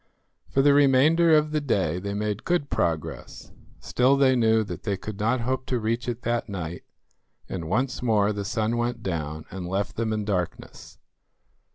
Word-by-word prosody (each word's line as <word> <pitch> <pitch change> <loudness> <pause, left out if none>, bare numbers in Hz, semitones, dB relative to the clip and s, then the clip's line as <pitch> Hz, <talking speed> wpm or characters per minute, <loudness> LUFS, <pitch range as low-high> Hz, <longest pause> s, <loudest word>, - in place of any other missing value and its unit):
For 135 - +2
the 145 0 +6
remainder 150 +4 +5
of 150 0 +1
the 155 -1 0
day 95 - 0
they 100 +2 -4
made 105 0 -2
good 170 -5 -1
progress; 85 -9 -3 0.3
still 130 +3 +2
they 135 -1 +4
knew 110 -2 +3
that 105 - -7
they 100 -3 -2
could 110 +1 -7
not 115 +4 +1
hope 130 +1 -2
to 125 - 0
reach 115 +2 -2
it 120 0 -5
that 120 -1 -1
night, 85 -3 -6 0.6
and 85 -4 -5
once 130 +7 -1
more 105 -3 +2
the 100 0 -4
sun 110 +3 -1
went 120 -1 -2
down 80 -4 -4
and 90 -1 -6
left 100 +2 -2
them 115 -1 -1
in 105 -1 -2
darkness. 90 -4 -4
110 Hz, 180 wpm, -25 LUFS, 100-130 Hz, 0.6 s, the